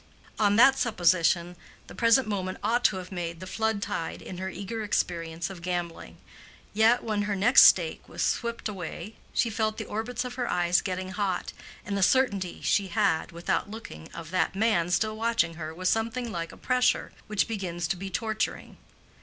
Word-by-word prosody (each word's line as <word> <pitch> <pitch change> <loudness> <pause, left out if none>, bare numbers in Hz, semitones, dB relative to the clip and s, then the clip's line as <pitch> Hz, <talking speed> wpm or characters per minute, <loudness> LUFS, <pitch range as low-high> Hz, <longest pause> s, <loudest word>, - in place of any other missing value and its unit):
On 205 -1 +4
that 265 +4 +6
supposition 175 -5 +2 0.3
the - - -12
present 230 +1 +4
moment 185 -3 -3
ought 235 +4 +1
to - - +4
have 185 0 -8
made 170 -2 -4
the 185 - -7
flood 220 +1 -1
tide 200 -5 -4
in 180 - -8
her 190 0 -3
eager 200 +4 -5
experience 170 -3 -2
of 180 -3 -10
gambling. 175 -1 -4 0.6
Yet, 225 +3 +4
when 215 -2 -1
her 205 0 -1
next 205 +7 +7
stake - - +3
was - - -3
swept 235 -1 -1
away, 200 +2 -7
she 230 - +1
felt 215 0 -1
the - - -4
orbits 225 +4 -3
of 250 - -5
her 245 - -1
eyes 175 0 +2
getting 185 0 -4
hot, 190 0 -2 0.3
and 200 - -3
the 200 - -1
certainty 200 -5 +2
she 200 -1 +2
had 160 -2 +1
(without 170 +4 -2
looking) 210 - -9
of 170 -1 -9
that 185 +1 0
man 195 -5 +2
still 215 +5 +1
watching 225 -7 +1
her 160 -1 -6
was 185 +3 -3
something 230 +3 0
like 170 -3 -4
a - - -13
pressure 250 -1 +1 0.2
which 210 -2 +1
begins 175 -6 -3
to - - +1
be 190 +2 -6
torturing. 220 +3 -3
200 Hz, 185 wpm, -27 LUFS, 175-220 Hz, 0.6 s, next